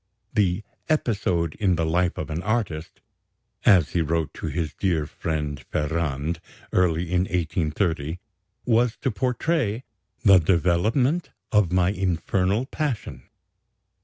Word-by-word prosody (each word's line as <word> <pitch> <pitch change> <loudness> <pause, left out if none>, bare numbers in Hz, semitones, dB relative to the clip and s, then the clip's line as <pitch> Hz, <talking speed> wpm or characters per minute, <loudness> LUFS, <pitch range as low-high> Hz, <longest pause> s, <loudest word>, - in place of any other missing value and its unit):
The 100 -1 +1 0.3
"Episode 95 - +1
in 95 -4 +3
the 85 -1 0
Life 85 +2 +1
of - - -4
an 80 +3 -2
Artist," 95 -7 -2 0.7
as 85 -7 +6
he 85 - +1
wrote 80 0 -1
to - - -5
his 80 -3 -2
dear 85 -6 0
friend 75 -2 -3
Ferrand 80 +1 -1 0.3
early 85 -1 +2
in 90 0 +3
1830, 80 -2 -1 0.5
was 120 -1 +2
to 130 - -1
portray 125 0 0 0.4
"the 100 -2 +8
development 95 - +2 0.2
of 105 -5 +3
my 90 +1 +3
infernal 95 +3 0
passion." 125 - -4
90 Hz, 120 wpm, -24 LUFS, 80-105 Hz, 0.7 s, the